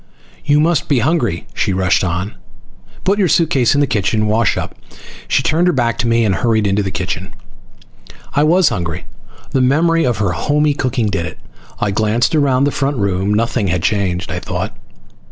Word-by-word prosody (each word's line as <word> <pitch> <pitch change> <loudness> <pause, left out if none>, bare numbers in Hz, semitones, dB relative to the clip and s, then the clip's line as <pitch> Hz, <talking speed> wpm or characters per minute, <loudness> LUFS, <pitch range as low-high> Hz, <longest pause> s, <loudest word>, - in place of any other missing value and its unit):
"You 145 +1 +3
must 165 +2 +1
be 140 - +3
hungry," 120 - 0
she 95 - -1
rushed 95 0 +1
on. 90 +3 -2 0.7
"Put 195 +2 +1
your 190 - +3
suitcase 145 -7 +2
in 145 - +3
the 140 - +1
room 105 - 0 0.2
and - - +1
wash 110 +1 +1
up." - - -4 0.5
She - - +1
turned 165 +4 +2
her 180 - +3
back 120 -4 0
to 120 - 0
me 115 0 +2
and 100 - +2
hurried 110 -1 +1
into 100 +1 +1
the 100 - -2
kitchen. 95 0 -4 1.0
I 145 - +2
was 170 +2 +4
hungry. 85 -2 -4 0.5
The 130 - +1
memory 165 +6 +2
of 120 -4 0
her 100 -3 0
homey 145 - +1
cooking 130 -4 -1
did 95 -5 -1
it. 80 - -9 0.4
I 100 - 0
glanced 110 - +1
around 140 -4 +2
the 145 - +2
front 140 0 -1
room. 100 -1 0
Nothing 115 0 0
had 90 -1 -1
changed, 95 -3 -1
I - - -3
thought. - - -4
115 Hz, 190 wpm, -17 LUFS, 100-145 Hz, 1.0 s, was